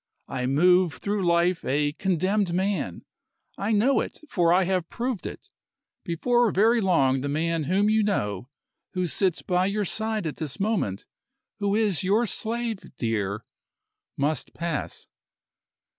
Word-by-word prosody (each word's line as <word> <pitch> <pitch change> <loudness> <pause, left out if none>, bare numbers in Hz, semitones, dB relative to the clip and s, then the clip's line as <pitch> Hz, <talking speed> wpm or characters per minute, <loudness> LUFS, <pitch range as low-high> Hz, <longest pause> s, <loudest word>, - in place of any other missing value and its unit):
I 125 0 -2
move 180 +4 +4
through 200 -3 -2
life 170 +1 +2
a 145 +2 +1
condemned 190 +2 0
man. 185 - -1 0.5
I 200 +3 -2
know 230 +6 +3
it - - -4
for 170 -3 +3
I 185 +2 +4
have 185 -2 -1
proved 240 -4 -3
it. - - -10 0.5
Before 240 +8 +2
very 225 +4 +3
long 135 -9 +2
the 140 - -3
man 160 +1 0
whom 190 +6 +2
you 215 +1 +3
know, 115 - -1 0.4
who 185 -1 0
sits 180 +1 0
by 180 0 +1
your 205 +1 -1
side 220 0 -1
at 155 - -4
this 155 +1 -5
moment, 195 - -1 0.5
who 200 0 +1
is 210 -6 +1
your 205 +6 +2
slave, 230 0 -2 0.2
dear, 105 -3 -2 0.7
must 145 0 -1
pass." 170 -4 -4
185 Hz, 145 wpm, -26 LUFS, 155-210 Hz, 0.7 s, move